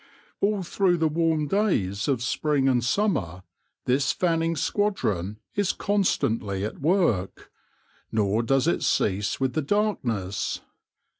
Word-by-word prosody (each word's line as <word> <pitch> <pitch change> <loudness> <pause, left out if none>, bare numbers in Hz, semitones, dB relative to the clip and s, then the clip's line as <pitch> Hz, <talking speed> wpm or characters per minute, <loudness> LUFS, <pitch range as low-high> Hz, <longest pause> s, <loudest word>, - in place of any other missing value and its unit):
All 200 -1 +1
through 180 0 +1
the 160 -1 +2
warm 160 -1 +1
days 120 - 0
of 130 -4 0
spring 140 +1 +1
and 125 -3 +2
summer 120 - 0 0.4
this 135 +2 +2
fanning 165 -2 0
squadron 110 - -1 0.2
is 205 -2 +1
constantly 110 - 0
at 110 - -6
work; 150 - 0 0.6
nor 105 +1 +1
does 135 +4 +1
it 170 - +1
cease 100 0 0
with 130 -1 0
the 155 - 0
darkness. 130 - -1
140 Hz, 125 wpm, -25 LUFS, 105-180 Hz, 0.6 s, the